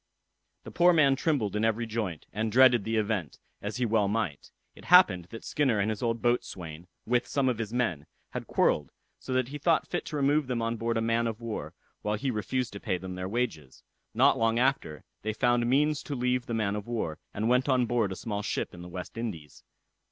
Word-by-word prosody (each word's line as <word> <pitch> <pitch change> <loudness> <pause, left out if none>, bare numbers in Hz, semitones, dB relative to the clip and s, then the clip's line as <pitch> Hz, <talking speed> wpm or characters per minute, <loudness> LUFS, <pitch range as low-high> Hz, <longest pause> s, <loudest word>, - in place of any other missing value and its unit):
The - - -9
poor 175 +1 +5
man 140 -4 +5
trembled 135 - 0
in 105 - 0
every 115 +1 +1
joint, 110 -8 -4
and 110 +1 -1
dreaded 125 -3 +6
the 115 0 -1
event, 105 -6 -1 0.2
as 105 +4 -4
he 125 - +1
well 110 -3 +2
might. 100 -9 -2 0.2
It - - -15
happened 90 -2 +6
that 115 - -9
Skinner 130 -8 +1
and 105 +2 +1
his 105 - -5
old 115 -1 -1
boatswain, 90 -9 -2 0.2
with 120 +1 +1
some 140 -2 +1
of 125 -3 0
his 110 -2 -3
men, 105 -12 -1 0.2
had - - -5
quarrelled, 75 -3 +2 0.3
so - - -8
that 130 -1 +1
he 145 +1 -6
thought 165 +2 +2
fit - - -3
to - - -6
remove 145 0 +2
them 125 -2 -1
on 115 0 -1
board 115 0 -1
a - - +1
man 115 +1 +1
of 110 -1 -4
war, 115 -2 -5 0.3
while 105 0 -1
he 130 +5 -2
refused 120 +3 -2
to 100 - -6
pay 95 - -1
them 95 0 -7
their 90 0 -4
wages. 100 - -3 0.3
Not - - +4
long 115 0 +2
after, 125 - 0 0.2
they 110 +1 -2
found 120 +1 +2
means 150 +3 +2
to 145 - -5
leave 125 0 0
the 115 - -2
man 105 -2 0
of 105 +1 -5
war, 95 -10 -3
and 110 +2 -2
went 125 +3 +2
on 130 -2 +3
board 115 -4 0
a - - -3
small 105 +1 -4
ship 105 - -3
in 90 - -10
the 90 - -9
West 90 +5 -7
Indies. 80 - -6
115 Hz, 225 wpm, -28 LUFS, 100-125 Hz, 0.3 s, dreaded